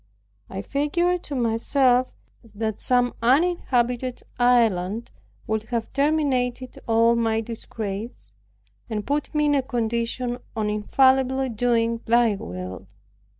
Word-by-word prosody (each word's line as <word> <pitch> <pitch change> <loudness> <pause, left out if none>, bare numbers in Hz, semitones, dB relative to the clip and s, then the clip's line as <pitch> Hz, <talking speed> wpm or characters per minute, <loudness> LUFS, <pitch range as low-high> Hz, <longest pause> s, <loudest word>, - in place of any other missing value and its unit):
I 195 +1 -5
figured 345 +7 0
to 285 - -5
myself, 250 +2 +2 0.4
that 220 -1 -3
some 245 -1 +2
uninhabited 255 -3 +1 0.2
island 230 -4 +2 0.3
would 220 0 -2
have 230 -1 -3
terminated 270 -4 0
all 230 +1 +4
my 225 -1 +1
disgraces, 220 -1 -6 0.6
and 210 -2 -3
put 290 +1 -1
me 300 0 +3
in 295 - +3
a 280 - +3
condition 240 0 -2 0.2
of 220 -1 -1
infallibly 260 +5 +2
doing 230 0 0
Thy 235 -1 +4
will. 90 - -7
240 Hz, 110 wpm, -24 LUFS, 225-260 Hz, 0.6 s, all